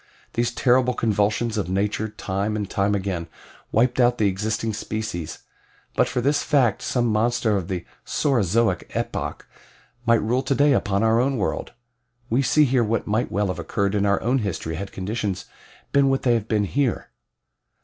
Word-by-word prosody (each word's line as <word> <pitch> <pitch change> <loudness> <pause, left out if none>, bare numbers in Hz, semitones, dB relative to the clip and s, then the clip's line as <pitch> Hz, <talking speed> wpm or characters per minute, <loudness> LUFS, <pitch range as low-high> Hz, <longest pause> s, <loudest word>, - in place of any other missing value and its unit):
These 120 0 0
terrible 125 0 +3
convulsions 110 +1 +1
of 95 - -3
nature 105 +3 0
time 100 +1 -3
and 105 -2 -2
time 100 +2 +1
again 95 -4 -3 0.4
wiped 120 +3 +2
out 120 0 +4
the 105 - +3
existing 110 +3 -1
species 110 -6 -5 0.5
but - - +3
for 125 - -1
this 145 +3 +2
fact 130 -9 +2
some 120 -2 0
monster 115 0 +1
of 95 -4 -2
the 90 -3 -4 0.2
Saurozoic 115 - +1
epoch - - -3 0.6
might 115 -2 +4
rule 120 +4 +1
today 140 +2 +3
upon 100 -3 +1
our 115 +1 +4
own 135 +2 +1
world. 100 - -2 0.6
We 125 +4 +3
see 150 +3 +4
here 125 -2 +2
what 115 +1 -1
might 110 +4 0
well 100 -1 0
have 90 -1 -3
occurred 100 +3 -1
in 100 -1 +1
our 100 -1 +2
own 125 +3 +2
history 90 -6 -3
had 95 +5 -5
conditions 100 0 -3 0.5
been 140 -1 +4
what 135 0 0
they 120 - +4
have 115 -2 -1
been 105 -2 +1
here. 130 +4 -1
110 Hz, 170 wpm, -23 LUFS, 100-120 Hz, 0.6 s, out